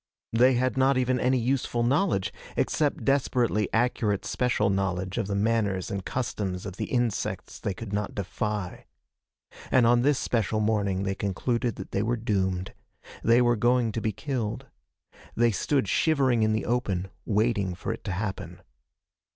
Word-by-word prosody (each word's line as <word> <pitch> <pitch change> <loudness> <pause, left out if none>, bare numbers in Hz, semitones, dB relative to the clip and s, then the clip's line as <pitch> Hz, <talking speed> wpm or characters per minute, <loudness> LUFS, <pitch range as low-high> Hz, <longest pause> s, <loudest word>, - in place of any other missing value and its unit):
They 125 +3 +5
had 130 +2 0
not 135 0 +4
even 130 0 +1
any 130 +2 +2
useful 120 -1 0
knowledge, 135 - +1 0.2
except 150 -2 0
desperately 125 -6 +1
accurate 115 -3 +1
special 125 -5 +1
knowledge 95 -1 -1
of - - -1
the 100 - -2
manners 100 -3 0
and 100 -1 -3
customs 100 -7 -3
of 100 -1 -7
the - - -2
insects 120 -4 -2
they 100 - -3
could 105 0 -7
not 105 0 -2
defy. 105 -1 -4 0.8
And 130 -2 +4
on 120 +1 +5
this 140 +1 +3
special 110 -4 0
morning 100 -3 +1
they 95 0 -1
concluded 115 +5 -1
that 95 - -8
they 100 - 0
were 120 +3 0
doomed. 95 -4 -1 0.5
They 115 +2 +5
were 120 0 +3
going 120 +1 +2
to 115 - -3
be 110 - 0
killed. 120 +2 -3 0.7
They 120 0 +3
stood 130 +3 0
shivering 130 - +2
in 110 0 +3
the 110 - -1
open, 100 -7 -1
waiting 105 -4 +1
for - - -3
it - - -10
to 100 - -2
happen. 95 +2 -4
110 Hz, 160 wpm, -27 LUFS, 100-125 Hz, 0.8 s, They